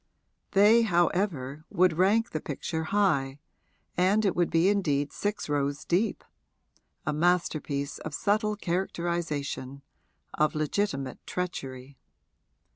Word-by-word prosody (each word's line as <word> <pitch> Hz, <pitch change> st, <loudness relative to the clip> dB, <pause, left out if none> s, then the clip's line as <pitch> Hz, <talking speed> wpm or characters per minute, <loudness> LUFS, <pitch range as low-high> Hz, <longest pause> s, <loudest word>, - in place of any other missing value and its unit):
They, 210 Hz, +4 st, +6 dB
however, 175 Hz, -, 0 dB
would 180 Hz, -1 st, +3 dB
rank 205 Hz, +6 st, +3 dB
the 155 Hz, -, -3 dB
picture 160 Hz, +2 st, -4 dB
high, 150 Hz, -9 st, +1 dB, 0.6 s
and 195 Hz, +4 st, +3 dB
it 195 Hz, -, +1 dB
would 175 Hz, -1 st, +2 dB
be 165 Hz, +2 st, +3 dB
indeed 150 Hz, -8 st, +1 dB
six 205 Hz, +1 st, -2 dB
rows 145 Hz, 0 st, -1 dB
deep 190 Hz, +6 st, 0 dB, 0.8 s
a 155 Hz, -, 0 dB
masterpiece 155 Hz, -4 st, 0 dB
of 155 Hz, -2 st, -6 dB
subtle 210 Hz, +5 st, +1 dB
characterisation, 170 Hz, -7 st, -3 dB, 0.5 s
of 155 Hz, 0 st, +1 dB
legitimate 150 Hz, -4 st, -1 dB
treachery. 135 Hz, -7 st, -5 dB
170 Hz, 110 wpm, -28 LUFS, 145-195 Hz, 0.8 s, They